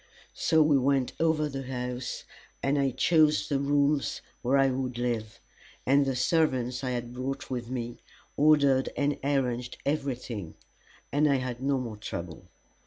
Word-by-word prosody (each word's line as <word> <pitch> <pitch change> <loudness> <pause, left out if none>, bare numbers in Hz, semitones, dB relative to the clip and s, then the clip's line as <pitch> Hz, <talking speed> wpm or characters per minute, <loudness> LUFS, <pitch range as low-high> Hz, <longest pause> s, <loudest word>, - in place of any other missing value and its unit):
So 160 -1 +3
we 150 -2 +4
went 135 -1 +1
over 160 -2 +2
the 135 -2 -5
house, 125 -1 -4 0.4
and 140 +1 +2
I 135 -1 +2
chose 155 +4 +3
the 140 -2 +1
rooms 140 0 +1 0.2
where 130 +3 +2
I 135 -1 +4
would 125 -1 -3
live; 115 -3 -2 0.5
and 140 +1 +4
the 135 - 0
servants 130 -3 +1
I 130 - -1
had 120 -1 -3
brought 130 +2 -4
with 120 -2 -3
me 120 -2 -4 0.4
ordered 140 -3 +4
and 145 0 0
arranged 125 -3 -1
everything, 125 - -3 0.6
and 150 +1 +3
I - - +4
had 130 -2 -3
no 135 0 +1
more 115 -4 -5
trouble. 85 -5 -7
130 Hz, 155 wpm, -28 LUFS, 125-140 Hz, 0.6 s, we